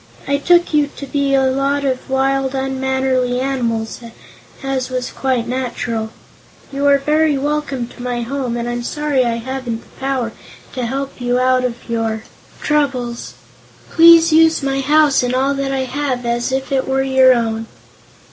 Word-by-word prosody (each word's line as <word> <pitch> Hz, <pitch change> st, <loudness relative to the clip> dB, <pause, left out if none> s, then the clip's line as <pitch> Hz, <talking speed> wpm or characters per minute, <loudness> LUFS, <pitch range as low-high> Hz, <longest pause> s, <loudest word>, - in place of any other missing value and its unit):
"I 280 Hz, 0 st, +1 dB
took 345 Hz, +3 st, +3 dB
you 295 Hz, -1 st, +3 dB
to 280 Hz, -, -6 dB
be 280 Hz, 0 st, 0 dB
a 270 Hz, -, +3 dB
lot 275 Hz, +2 st, 0 dB
of 260 Hz, -1 st, -2 dB
wild, 270 Hz, 0 st, 0 dB
unmannerly 265 Hz, -1 st, 0 dB
animals, 235 Hz, -4 st, -2 dB, 0.6 s
as 265 Hz, -1 st, -2 dB
was 255 Hz, -1 st, -3 dB
quite 255 Hz, -3 st, -1 dB
natural. 245 Hz, -3 st, -3 dB, 0.6 s
You 280 Hz, +1 st, 0 dB
are 280 Hz, 0 st, +6 dB
very 300 Hz, +1 st, +1 dB
welcome 285 Hz, -3 st, -2 dB
to -, -, -13 dB
my 245 Hz, -1 st, -2 dB
home 250 Hz, -1 st, -3 dB
and 235 Hz, 0 st, -3 dB
I'm 240 Hz, 0 st, -3 dB
sorry 290 Hz, +1 st, 0 dB
I 235 Hz, -1 st, 0 dB
haven't 240 Hz, -1 st, -4 dB
the -, -, -22 dB
power 265 Hz, -4 st, -1 dB, 0.4 s
to 250 Hz, -3 st, -3 dB
help 270 Hz, +1 st, -5 dB
you 245 Hz, 0 st, +1 dB
out 255 Hz, 0 st, +2 dB
of 240 Hz, -1 st, -4 dB
your 225 Hz, -2 st, -2 dB, 0.4 s
troubles. 260 Hz, -5 st, -1 dB, 0.6 s
Please 330 Hz, -1 st, +7 dB
use 320 Hz, -1 st, +4 dB
my 275 Hz, 0 st, 0 dB
house 295 Hz, +1 st, +3 dB
and 250 Hz, 0 st, -1 dB
all 270 Hz, +2 st, +1 dB
that 275 Hz, 0 st, -2 dB
I 265 Hz, -1 st, -1 dB
have, 260 Hz, -1 st, -3 dB
as 240 Hz, +2 st, -1 dB
if 265 Hz, 0 st, -2 dB
it 265 Hz, -1 st, 0 dB
were 265 Hz, 0 st, +1 dB
your 265 Hz, -1 st, +5 dB
own." 225 Hz, -1 st, -2 dB
265 Hz, 165 wpm, -18 LUFS, 245-275 Hz, 0.6 s, Please